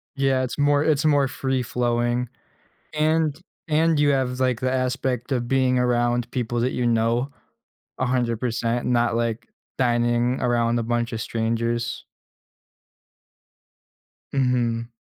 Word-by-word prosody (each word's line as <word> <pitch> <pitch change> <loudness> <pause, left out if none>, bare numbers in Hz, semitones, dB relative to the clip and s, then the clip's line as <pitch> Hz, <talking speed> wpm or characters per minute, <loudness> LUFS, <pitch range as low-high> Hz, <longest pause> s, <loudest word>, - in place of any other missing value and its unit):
Yeah, 135 -2 +1
it's 130 +2 -4
more 145 0 +3
it's 155 -1 +1
more 145 -3 +4
free-flowing, 125 -2 -1 0.7
and 155 -1 +1 0.3
and 160 0 +2
you 145 - +4
have, 130 -2 0
like, 130 -3 +1
the 130 - 0
aspect 130 -1 -1
of 125 -3 -1
being 130 -1 +2
around 120 -1 +1
people 120 -2 -2
that 125 +2 0
you 125 - -1
know, 115 +3 +1 0.7
100%, 120 -1 -1
not 120 -1 +2
like 115 -1 -2 0.3
dining 120 0 +1
around 120 -1 +1
a - - 0
bunch 120 0 -1
of 110 - -3
strangers. 115 +1 -2 2.3
Mhm. 120 -3 0
125 Hz, 120 wpm, -23 LUFS, 120-130 Hz, 2.3 s, more